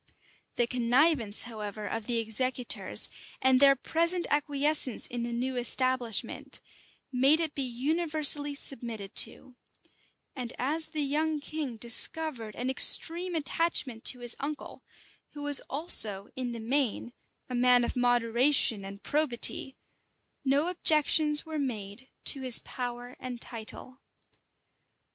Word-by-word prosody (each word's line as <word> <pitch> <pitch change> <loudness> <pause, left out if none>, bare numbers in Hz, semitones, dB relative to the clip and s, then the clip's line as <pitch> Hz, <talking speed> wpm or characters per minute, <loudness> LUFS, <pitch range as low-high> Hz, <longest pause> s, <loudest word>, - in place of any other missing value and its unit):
The 240 - +1
connivance, 245 -1 +1
however, 215 -3 -8
of 225 0 -5
the 240 -2 -1
executors, 245 +3 -1 0.3
and 260 -1 +3
their 275 0 +6
present 335 +6 -1
acquiescence 290 -2 0
in 240 -1 -2
the 235 0 -4
new 250 +2 -3
establishment, 245 -2 -1 0.5
made 270 +5 +3
it 320 -3 -3
be 280 - -4
universally 290 +2 +2
submitted 230 -7 -5
to; 255 - +2 0.8
and 250 -3 -5
as 310 +5 +2
the 310 -2 -3
young 305 +2 -1
king 290 -5 -6
discovered 235 0 0
an 250 - -5
extreme 340 +6 +3
attachment 290 -6 0
to 250 - +4
his 240 -1 -1
uncle, 295 +2 -7 0.5
who 290 - -9
was 290 -1 +5
also, 215 - +2
in 255 -2 -4
the 235 - -7
main, 245 0 -2 0.3
a 255 - -8
man 245 0 +3
of - - -3
moderation 245 -2 +2
and 200 +1 -10
probity, 270 -2 -1 0.7
no 280 +4 +1
objections 310 -3 +2
were 315 -1 -5
made 230 -2 -6 0.2
to 275 - +6
his 255 -2 +5
power 245 0 -7
and 250 -2 -7
title. 240 +3 -10
255 Hz, 125 wpm, -28 LUFS, 235-295 Hz, 0.8 s, their